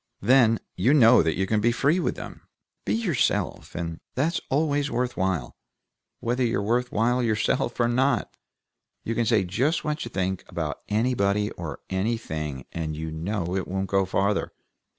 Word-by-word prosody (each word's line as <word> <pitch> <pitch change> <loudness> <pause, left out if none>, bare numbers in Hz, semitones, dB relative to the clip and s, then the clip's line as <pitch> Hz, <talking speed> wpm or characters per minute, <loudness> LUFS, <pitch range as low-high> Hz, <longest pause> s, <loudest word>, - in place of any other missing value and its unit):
Then, 115 -1 +5 0.2
you 135 +5 +3
know 125 -3 +7
that 80 0 0
you 95 - 0
can 105 +2 +1
be 120 +2 +3
free 145 +8 +2
with - - -1
them, - - -9 0.4
be - - +1
yourself, 190 - -1
and 85 -1 -4 0.2
that's 160 +6 0
always 145 0 +1
worth 125 0 -1
while, 95 -9 -1 0.7
whether 125 +2 0
you're 115 -3 +1
worth 120 +4 0
while 120 +4 +2
yourself 115 +1 0
or 120 - +4
not. 130 +4 +1 0.7
You 115 - -2
can 115 0 0
say 110 -3 +3
just 125 - 0
what 150 0 -2
you 120 - -6
think 95 -2 -2
about - - -4
anybody 105 -2 +1
or 80 -5 -7
anything, 80 - -2
and 80 -2 -3
you 80 0 -4
know 90 +2 -2
it 95 - -2
won't 95 0 -2
go 95 -1 +3
farther. 100 +2 0
110 Hz, 170 wpm, -25 LUFS, 95-125 Hz, 0.7 s, know